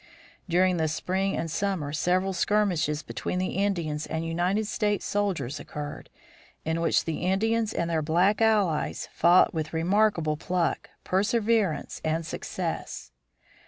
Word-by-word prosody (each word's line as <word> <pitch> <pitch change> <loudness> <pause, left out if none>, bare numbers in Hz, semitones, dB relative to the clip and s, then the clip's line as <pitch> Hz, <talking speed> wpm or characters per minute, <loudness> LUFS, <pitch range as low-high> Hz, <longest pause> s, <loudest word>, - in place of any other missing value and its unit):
During 180 +1 +3
the 160 -1 +1
spring 190 +5 -1
and 165 -1 -3
summer 180 -7 -1
several 185 +4 +1
skirmishes 175 -7 +1
between 115 +9 -4
the 185 0 -1
Indians 170 -6 -1
and 160 +1 -3
United 180 +6 0
States 210 -1 -1
soldiers 170 -10 -1
occurred, 145 0 -7 0.6
in 160 +1 -1
which 165 - +2
the 165 - -2
Indians 220 +4 +1
and 170 - -1
their 165 -2 0
black 180 +7 +2
allies 205 -8 +1
fought 175 +2 +5
with 155 -1 -3
remarkable 170 -2 +2
pluck, 175 +1 -1
perseverance, 210 - +1
and 160 +1 -1
success. 65 - -5
180 Hz, 130 wpm, -27 LUFS, 160-200 Hz, 0.6 s, fought